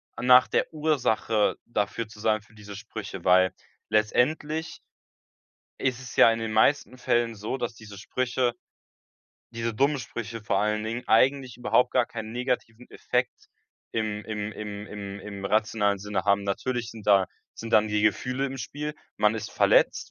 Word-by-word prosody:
a -, -, -6 dB
nach 125 Hz, 0 st, +7 dB
der -, -, 0 dB
Ursache 130 Hz, -8 st, +1 dB
dafür 105 Hz, 0 st, -2 dB
zu 105 Hz, 0 st, -14 dB
sagen 110 Hz, -1 st, +2 dB
für 105 Hz, +2 st, -23 dB
diese 105 Hz, -2 st, -10 dB
Sprüche, -, -, -8 dB
weil 95 Hz, 0 st, +5 dB, 0.4 s
letztendlich 150 Hz, +9 st, 0 dB, 1.0 s
ist 125 Hz, -1 st, 0 dB
es 130 Hz, -, -9 dB
ja 115 Hz, -, +7 dB
in 115 Hz, -, -2 dB
den 110 Hz, -1 st, -3 dB
meisten 130 Hz, +3 st, +2 dB
Fällen 120 Hz, -2 st, +1 dB
so, 105 Hz, +5 st, -4 dB
dass 120 Hz, -3 st, -4 dB
diese 105 Hz, -2 st, -12 dB
Sprüche 125 Hz, +3 st, -1 dB, 1.0 s
diese 115 Hz, 0 st, -3 dB
dummen 140 Hz, +5 st, +2 dB
Sprüche 115 Hz, -2 st, -6 dB
vor 100 Hz, -2 st, 0 dB
allen 105 Hz, +1 st, 0 dB
Dingen, 115 Hz, +3 st, -4 dB
eigentlich 130 Hz, +1 st, +3 dB
überhaupt 125 Hz, 0 st, +2 dB
gar 125 Hz, -, +3 dB
keinen 110 Hz, -1 st, -7 dB
negativen 125 Hz, -1 st, -3 dB
Effekt 125 Hz, 0 st, -2 dB, 0.5 s
im 110 Hz, -2 st, -2 dB
im 105 Hz, -1 st, -4 dB
im 105 Hz, -1 st, -7 dB
im 100 Hz, -1 st, -7 dB
im 100 Hz, -1 st, -8 dB
rationalen 105 Hz, -1 st, +1 dB
Sinne 100 Hz, -1 st, -3 dB
haben. 100 Hz, 0 st, +3 dB
Natürlich 120 Hz, +4 st, -2 dB
sind 110 Hz, -3 st, -11 dB
da 100 Hz, -2 st, +5 dB, 0.3 s
sind 115 Hz, 0 st, -8 dB
dann 110 Hz, 0 st, +5 dB
die 105 Hz, 0 st, 0 dB
Gefühle 125 Hz, +5 st, +1 dB
im 135 Hz, 0 st, -6 dB
Spiel. 150 Hz, +3 st, -5 dB, 0.2 s
Man 105 Hz, +1 st, +3 dB
ist 110 Hz, -2 st, -5 dB
verletzt, -, -, +3 dB
110 Hz, 165 wpm, -26 LUFS, 105-125 Hz, 1.0 s, nach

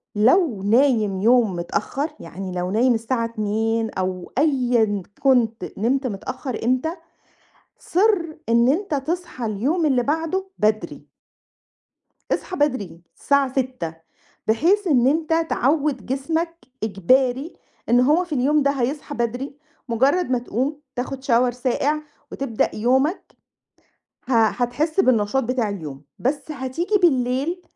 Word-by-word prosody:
لو 235 Hz, -, +3 dB
نايم 215 Hz, -4 st, +3 dB
يوم 230 Hz, -3 st, +4 dB
متأخّر، 270 Hz, -, -2 dB
يعني 185 Hz, +3 st, -7 dB
لو 180 Hz, 0 st, -3 dB
نايم 240 Hz, +4 st, +3 dB
الساعة 230 Hz, +1 st, -1 dB
02:00 225 Hz, 0 st, -1 dB
أو 185 Hz, -2 st, -4 dB
أيًا 245 Hz, -, +2 dB, 0.2 s
كُنت 240 Hz, -5 st, +2 dB
نمت 255 Hz, +5 st, +1 dB
متأخّر 250 Hz, +4 st, -5 dB
إمتى، 255 Hz, +6 st, +1 dB, 0.9 s
صِرّ 360 Hz, -4 st, +1 dB
إن 235 Hz, +1 st, +4 dB
أنت 330 Hz, +4 st, 0 dB
تصحى 290 Hz, -2 st, -3 dB
اليوم 270 Hz, -, 0 dB
اللي 260 Hz, -4 st, +2 dB
بعده 325 Hz, +7 st, -1 dB
بدري. 215 Hz, +1 st, -1 dB, 1.2 s
اصحى 370 Hz, -, -2 dB
بدري، 210 Hz, -, -1 dB
الساعة 280 Hz, -2 st, +1 dB
06:00، 255 Hz, -11 st, -3 dB, 0.5 s
بحيث 345 Hz, -, +2 dB
إن 255 Hz, -6 st, +4 dB
أنت 325 Hz, +2 st, +1 dB
تعوّد 280 Hz, -3 st, +1 dB
جسمك، 320 Hz, +6 st, -2 dB, 0.3 s
إجباري، 255 Hz, -, +1 dB, 0.4 s
إن 240 Hz, +1 st, +5 dB
هو 300 Hz, +8 st, +4 dB
في 340 Hz, -, -6 dB
اليوم 285 Hz, +3 st, +2 dB
ده 280 Hz, -, +3 dB
هيصحى 280 Hz, +2 st, -3 dB
بدري، 245 Hz, +4 st, -3 dB, 0.3 s
مجرّد 270 Hz, +8 st, +2 dB
ما 250 Hz, -, +2 dB
تقوم، 265 Hz, +5 st, -3 dB
تاخد 260 Hz, +1 st, -4 dB
Shower 245 Hz, -1 st, +3 dB
ساقع، 260 Hz, +5 st, 0 dB, 0.3 s
وتبدأ 240 Hz, -5 st, -1 dB
يومك، 265 Hz, -, +1 dB, 1.0 s
ه -, -, -1 dB
هتحس 255 Hz, -, 0 dB
بالنشاط 255 Hz, -, +2 dB
بتاع 245 Hz, -2 st, 0 dB
اليوم، 155 Hz, -9 st, -6 dB, 0.2 s
بس 285 Hz, +4 st, -2 dB
هتيجي 300 Hz, +8 st, -1 dB
بالليل، 275 Hz, +3 st, +1 dB
255 Hz, 120 wpm, -22 LUFS, 225-295 Hz, 1.2 s, إن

